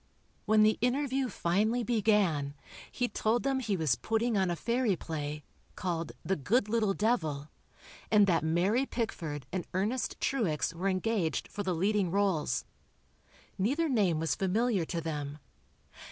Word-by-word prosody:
When 215 Hz, 0 st, +5 dB
the 215 Hz, 0 st, +3 dB
interview 265 Hz, +1 st, +1 dB
finally 215 Hz, +6 st, +1 dB
began, 200 Hz, -11 st, +1 dB, 0.4 s
he 245 Hz, -, 0 dB
told 230 Hz, 0 st, 0 dB
them 270 Hz, -1 st, +1 dB
he 210 Hz, -6 st, -1 dB
was 155 Hz, -6 st, +2 dB
putting 225 Hz, -, 0 dB
on 190 Hz, -2 st, +2 dB
a 175 Hz, -, 0 dB
fairy 235 Hz, +3 st, +1 dB
play, 150 Hz, -2 st, -5 dB, 0.3 s
called 170 Hz, -3 st, -3 dB
"The 190 Hz, +4 st, +1 dB
Good 205 Hz, -, +1 dB
Little 215 Hz, -3 st, +1 dB
Devil," 155 Hz, -10 st, 0 dB, 0.6 s
and 210 Hz, -2 st, +6 dB
that 170 Hz, -5 st, +2 dB
Mary 190 Hz, +11 st, +2 dB
Pickford 160 Hz, -, -3 dB
and 185 Hz, -2 st, -3 dB
Ernest 215 Hz, +6 st, -1 dB
Truex 180 Hz, -, 0 dB
were 185 Hz, +4 st, -1 dB
engaged 185 Hz, -4 st, 0 dB
for 205 Hz, -, -5 dB
the 185 Hz, -3 st, -1 dB
leading 195 Hz, +2 st, +1 dB
rôles. 185 Hz, -9 st, +1 dB, 1.0 s
Neither 280 Hz, -, +1 dB
name 200 Hz, -, +2 dB
was 160 Hz, -4 st, 0 dB
familiar 195 Hz, -, +1 dB
to 170 Hz, +1 st, -3 dB
them. 150 Hz, -3 st, -4 dB
195 Hz, 145 wpm, -31 LUFS, 165-230 Hz, 1.0 s, and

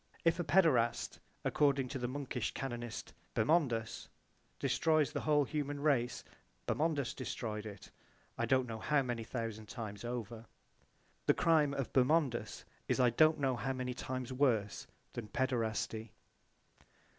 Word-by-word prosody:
If 165 Hz, +1 st, +3 dB
a -, -, +1 dB
paederast, 150 Hz, -9 st, +3 dB, 0.3 s
according 140 Hz, -3 st, +3 dB
to 135 Hz, -, -4 dB
the 120 Hz, -, -1 dB
monkish 130 Hz, -2 st, -3 dB
canonist 120 Hz, -4 st, -5 dB, 0.2 s
Bermondus, 115 Hz, -4 st, +1 dB, 0.5 s
destroys 150 Hz, +3 st, +2 dB
the 145 Hz, -, -2 dB
whole 150 Hz, -1 st, +3 dB
human 145 Hz, 0 st, -3 dB
race 140 Hz, -5 st, +1 dB, 0.4 s
Bermondus 150 Hz, -5 st, 0 dB
destroyed 110 Hz, -2 st, -4 dB
it 100 Hz, -2 st, -10 dB, 0.4 s
I -, -, -1 dB
don't 130 Hz, -1 st, +3 dB
know 110 Hz, -1 st, -5 dB
how 145 Hz, +3 st, +2 dB
many 120 Hz, -2 st, -3 dB
thousand 110 Hz, -2 st, -4 dB
times 110 Hz, -4 st, -6 dB
over. 120 Hz, -1 st, -5 dB, 0.8 s
The -, -, +5 dB
crime 155 Hz, -4 st, +3 dB
of 135 Hz, -3 st, -3 dB
Bermondus 130 Hz, -4 st, +2 dB, 0.2 s
is -, -, +1 dB
I 125 Hz, -2 st, +5 dB
don't 155 Hz, +6 st, +5 dB
know 135 Hz, -2 st, +1 dB
how 130 Hz, +3 st, -2 dB
many 130 Hz, -1 st, -3 dB
times 130 Hz, 0 st, -4 dB
worse 120 Hz, -7 st, +1 dB, 0.3 s
than 115 Hz, -3 st, -5 dB
paederasty. 115 Hz, -3 st, -1 dB
130 Hz, 135 wpm, -35 LUFS, 115-145 Hz, 0.8 s, The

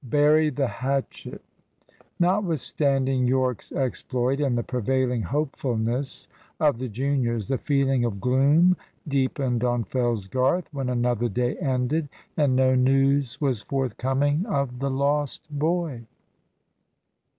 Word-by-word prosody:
"BURY 150 Hz, +4 st, +3 dB
THE 140 Hz, -1 st, -1 dB
HATCHET!" 135 Hz, +2 st, -4 dB, 0.8 s
Notwithstanding 145 Hz, -8 st, +1 dB
Yorke's 130 Hz, -2 st, 0 dB
exploit, 130 Hz, 0 st, -1 dB
and 135 Hz, -5 st, +1 dB
the 120 Hz, -, -1 dB
prevailing 125 Hz, 0 st, 0 dB
hopefulness 130 Hz, -2 st, -2 dB, 0.3 s
of 145 Hz, -6 st, +2 dB
the 130 Hz, -, -3 dB
juniors, 120 Hz, -3 st, -1 dB
the 135 Hz, -, 0 dB
feeling 135 Hz, -3 st, +1 dB
of 110 Hz, -4 st, -2 dB
gloom 145 Hz, -, +4 dB, 0.3 s
deepened 130 Hz, -3 st, 0 dB
on 120 Hz, -1 st, +1 dB
Fellsgarth 125 Hz, -, 0 dB
when 135 Hz, -3 st, -2 dB
another 120 Hz, -1 st, 0 dB
day 120 Hz, +4 st, -1 dB
ended, 140 Hz, 0 st, -1 dB, 0.3 s
and 145 Hz, -4 st, +2 dB
no 130 Hz, 0 st, +4 dB
news 135 Hz, 0 st, +2 dB
was 130 Hz, -7 st, 0 dB
forthcoming 135 Hz, -, 0 dB
of 140 Hz, -, -2 dB
the 140 Hz, +1 st, -1 dB
lost 140 Hz, +2 st, -1 dB
boy. 150 Hz, -5 st, -1 dB
130 Hz, 115 wpm, -25 LUFS, 125-145 Hz, 0.8 s, gloom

